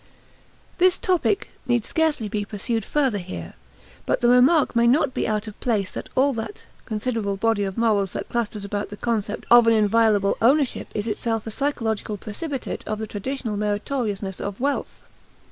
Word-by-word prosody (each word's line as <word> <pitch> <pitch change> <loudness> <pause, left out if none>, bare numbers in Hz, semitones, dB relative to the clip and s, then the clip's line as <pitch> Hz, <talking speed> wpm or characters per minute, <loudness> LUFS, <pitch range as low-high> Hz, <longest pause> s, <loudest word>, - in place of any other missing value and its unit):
This 365 0 +5
topic 370 +2 +1 0.2
need 240 -3 +1
scarcely 315 -9 +1
be 205 0 -2
pursued 220 +2 -2
further 265 -5 +1
here; 85 - -7 0.5
but - - +1
the 240 - +3
remark 255 +4 +5
may 235 0 +4
not 260 +2 +3
be - - -1
out 215 0 -1
of 210 - -9
place 210 -6 0
that - - -7
all 275 +2 +3
that 230 - -6 0.2
considerable 215 -3 -2
body 225 0 +1
of 195 -1 -5
morals 210 -5 +2
that - - -4
clusters 215 -3 -3
about 205 +1 -3
the 205 - -8
concept 220 -2 -2
of 240 -1 +8
an 230 - +6
inviolable 215 -2 +3
ownership 270 +3 +2
is 210 - -1
itself 225 0 -2
a 220 - -5
psychological 220 -5 -2
precipitate 265 - -5
of 215 - -2
the 220 - -4
traditional 220 +1 -4
meritoriousness 205 -2 -2
of 200 -1 -5
wealth. 280 +3 -2
225 Hz, 170 wpm, -23 LUFS, 205-250 Hz, 0.5 s, of